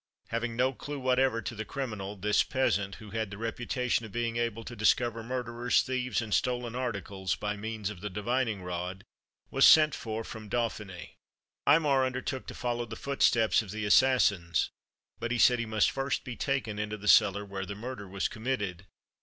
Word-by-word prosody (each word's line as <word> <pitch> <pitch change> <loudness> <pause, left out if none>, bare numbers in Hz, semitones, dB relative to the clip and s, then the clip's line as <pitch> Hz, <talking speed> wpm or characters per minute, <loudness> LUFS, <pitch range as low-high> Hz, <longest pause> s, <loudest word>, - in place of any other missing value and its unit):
Having 115 0 -2
no 130 +3 +2
clew 145 +3 -6
whatever 130 -2 +2
to - - -4
the 110 -1 -4
criminal, 105 -6 -5
this 105 +2 +2
peasant, 100 -7 0
who 105 -2 -12
had 110 -2 -2
the 100 - -8
reputation 120 +2 -1
of 110 - -8
being 115 0 -2
able 115 -1 -1
to 120 - -8
discover 115 +1 +2
murderers, 120 0 0
thieves, 125 -3 -1
and 110 -2 -4
stolen 120 -2 0
articles, 100 -7 -2
by 105 +2 -3
means 105 -1 -4
of 90 -4 -10
the 105 - -4
divining 110 0 -1
rod, 90 +1 -4 0.5
was 135 - +2
sent 155 -2 +8
for 110 0 -4
from 110 -2 -9
Dauphiny. 105 -5 -3 0.5
Aymar 145 -3 +5
undertook 130 0 -3
to - - -7
follow 120 -1 -2
the 110 - -7
footsteps 115 -6 +3
of 105 - -10
the 110 +2 -3
assassins, 100 - +3 0.5
but 120 - -2
he 125 - 0
said 125 +1 +5
he 115 - -2
must 110 -1 +2
first 135 0 -1
be 125 - -6
taken 120 -7 -2
into 105 0 -3
the 105 0 -8
cellar 105 -1 +5
where 95 -1 -5
the 100 - -5
murder 110 -1 -6
was 95 +1 -1
committed. 100 -6 -3
115 Hz, 185 wpm, -30 LUFS, 105-125 Hz, 0.5 s, sent